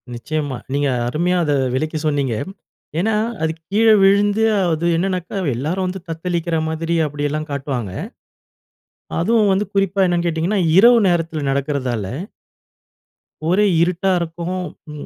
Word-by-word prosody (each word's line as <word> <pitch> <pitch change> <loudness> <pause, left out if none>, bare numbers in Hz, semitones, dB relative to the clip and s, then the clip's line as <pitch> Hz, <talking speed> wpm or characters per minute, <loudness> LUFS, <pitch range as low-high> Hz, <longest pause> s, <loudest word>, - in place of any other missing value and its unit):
நிச்சயமா. 145 +1 -3 0.2
நீங்க 145 0 +1 0.2
அருமையா 175 +8 0
அத 145 -2 +1 0.2
விளக்கி 155 +4 -2
சொன்னீங்க. 140 -5 0 0.6
ஏன்னா, 220 +4 +1 0.3
அது 160 0 +1 0.2
கீழ 220 +3 +3 0.2
விழுந்து 205 +2 +4 0.3
அது 160 +1 -1
என்னன்னாக்கா 185 +1 -2 0.2
எல்லாரும் 170 +9 -1
வந்து 190 +1 -4
தத்தளிக்கிற 170 0 -2
மாதிரி 165 +1 -2
அப்டியெல்லாம் 145 +1 -3
காட்டுவாங்க. 135 -7 -3 1.3
அதுவும் 215 +3 +3
வந்து 200 +2 0
குறிப்பா 195 0 +2
என்னன்னு 175 -1 0
கேட்டீங்கன்னா, 170 +5 0 0.2
இரவு 235 +3 +7
நேரத்ல 165 -3 0
நடக்றதால 135 -5 -1 1.5
ஒரே 195 +4 +3 0.2
இருட்டா 180 +2 +1
இருக்கும். 170 +2 -4 0.3
ம் 150 -1 -8
165 Hz, 120 wpm, -19 LUFS, 145-190 Hz, 1.5 s, இரவு